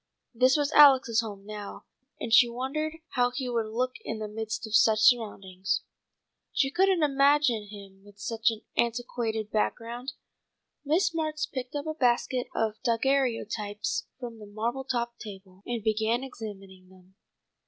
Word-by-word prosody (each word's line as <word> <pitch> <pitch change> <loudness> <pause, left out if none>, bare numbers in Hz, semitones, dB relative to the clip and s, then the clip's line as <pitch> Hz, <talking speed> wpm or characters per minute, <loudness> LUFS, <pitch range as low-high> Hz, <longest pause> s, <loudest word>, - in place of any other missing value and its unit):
This 255 +4 +4
was 290 0 0
Alex's 265 -6 +6
home 205 -3 -8
now, 210 -1 -8 0.3
and 225 - -3
she 240 +1 +7
wondered 280 +6 -3
how 245 -2 +2
he 255 +1 -4
would 230 -3 -1
look 250 +4 -2
in 225 - -4
the 215 0 -4
midst 220 +2 -4
of 220 - -9
such 220 -1 +5
surroundings. 205 -5 +1 0.7
She 270 -1 +1
couldn't 375 0 +3
imagine 275 -5 +3
him 200 -2 -12
with 205 0 -17
such 225 +2 0
an 220 -1 -5
antiquated 230 -2 -1
background. 235 +4 -2 0.7
Miss 335 +5 +2
Marks 310 -2 -1
picked 255 0 -6
up 285 - -3
a 315 - -2
basket 250 -2 +1
of 220 -1 -1
daguerreotypes 230 -4 0
from 235 -3 -7
the 210 - -10
marble 230 +6 -3
topped 235 -2 -2
table, 190 -3 -11
and 235 -3 -3
began 220 +3 +1
examining 195 -7 -9
them. 185 0 -20
235 Hz, 150 wpm, -28 LUFS, 215-265 Hz, 0.7 s, she